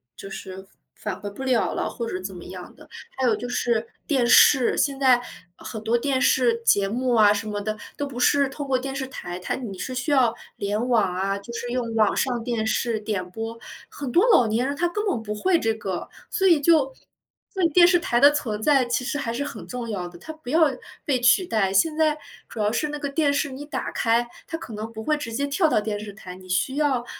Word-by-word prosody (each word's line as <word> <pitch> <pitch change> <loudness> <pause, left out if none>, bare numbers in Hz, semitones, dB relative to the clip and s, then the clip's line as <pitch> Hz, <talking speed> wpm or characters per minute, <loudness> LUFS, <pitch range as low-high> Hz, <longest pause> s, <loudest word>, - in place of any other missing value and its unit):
就 195 - -9
是 190 0 -8 0.3
返 185 - -5
回 205 - -4
不 200 +7 -8
了 255 -3 +1
了， - - -1
或 235 -1 -5
者 - - -5
是 185 - -4
怎 190 0 -6
么 175 - -9
样 180 -1 -10
的。 - - -17 0.3
还 260 -1 +1
有 220 - +3
就 245 - -6
是 235 -2 0 0.2
电 265 -5 +2
视， 250 +1 +6
现 275 -1 0
在 255 -3 +5 0.4
很 220 -1 -7
多 225 +2 +1
电 265 +2 +1
视 240 -2 +3
节 200 -3 +4
目 250 +3 0
啊， 210 -2 +6
什 210 +1 -1
么 205 -1 -3
的， 215 +1 -3 0.2
都 285 - -3
不 250 -3 -7
是 280 +2 +3
透 285 +1 -6
过 265 -2 +1
电 270 +1 -5
视 265 -1 -3
台 175 -9 -7
它 180 - -4
你 220 -7 -5
是 255 - -5
需 265 +4 -3
要 255 -5 +4 0.2
联 210 +5 -2
网 215 -7 +2
啊， 195 +2 -1
就 220 +4 -10
是 245 - -4
用 240 -2 -2
网 220 -2 +2
上 245 -3 0
电 230 -3 -1
视 225 0 0
点 205 -4 -3
播， 225 +4 -6 0.3
很 290 - -6
多 360 - +4
老 240 - +5
年 225 +4 0
人 285 - -2
他 350 +4 +1
根 415 +4 -3
本 245 - -1
不 210 -1 -5
会 350 - +2
这 225 - +1
个， 190 -5 -5 0.2
所 385 -2 +2
以 335 -5 +5
就 290 -3 +3 0.6
所 380 -2 -1
以 335 - +4
电 345 +2 +6
视 360 - +5
台 240 -8 +1
的 285 +3 +8
存 220 -8 -3
在 275 +2 +4
其 240 +1 -1
实 290 - -2
还 255 -5 -3
是 235 - -3
很 - - -7
重 245 -2 -6
要 180 -5 -4
的， 175 - -13
它 315 - -8
不 310 -5 -11
要 320 +5 +3 0.5
被 260 -4 +1
取 245 +10 +5
代。 205 - 0
现 305 +11 +2
在 310 -1 +2 0.3
主 225 - -9
要 210 - +2
是 300 +7 -1
那 295 0 -5
个 285 - -3
电 285 0 +1
视 285 +1 0
你 265 +2 -7
打 275 -3 -4
开， 235 +1 +1 0.2
它 325 - -5
可 235 - -9
能 215 +2 -6
不 220 -1 -7
会 305 - +2
直 290 -6 -6
接 280 +5 -1
跳 315 +3 +2
到 215 - +3
电 210 -1 -3
视 205 0 -7
台， 185 -3 -10
你 185 0 -14
需 185 +9 0
要， 280 -5 +1
240 Hz, 265 characters per minute, -24 LUFS, 215-280 Hz, 0.6 s, 的